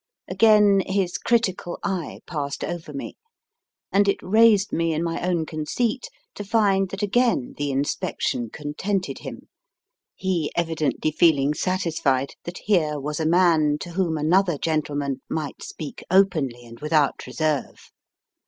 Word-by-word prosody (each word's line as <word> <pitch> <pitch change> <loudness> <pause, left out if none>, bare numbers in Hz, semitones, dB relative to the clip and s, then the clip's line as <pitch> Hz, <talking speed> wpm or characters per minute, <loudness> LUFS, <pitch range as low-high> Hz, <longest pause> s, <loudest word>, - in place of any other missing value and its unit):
Again 210 -3 +5
his 190 -2 -1
critical 195 -7 0
eye 185 -5 -3
passed 145 -4 -4
over 170 -3 -5
me, 140 - -7 0.7
and 200 +1 +3
it 200 - +2
raised 215 0 +4
me 165 -1 +1
in 160 - -1
my 165 -1 -2
own 175 -2 0
conceit 215 - -2 0.2
to 205 - -6
find 200 -3 +2
that 195 +2 -5
again 225 - +1
the 145 0 -2
inspection 135 -3 -1
contented 150 - -3
him, - - -9 0.7
he 180 -5 -1
evidently 160 -2 0
feeling 150 -3 +3
satisfied 160 -7 0
that 175 +1 -7
here 155 -8 +2
was 150 +2 -4
a 160 - 0
man 165 -4 +4
to 175 - -6
whom 170 -3 0
another 175 +2 +2
gentleman 145 -4 -2
might 155 -3 -4
speak 155 -3 -8
openly 155 -11 +2
and 115 0 -13
without 150 -3 +1
reserve. 155 +2 -2
165 Hz, 135 wpm, -24 LUFS, 150-195 Hz, 0.7 s, Again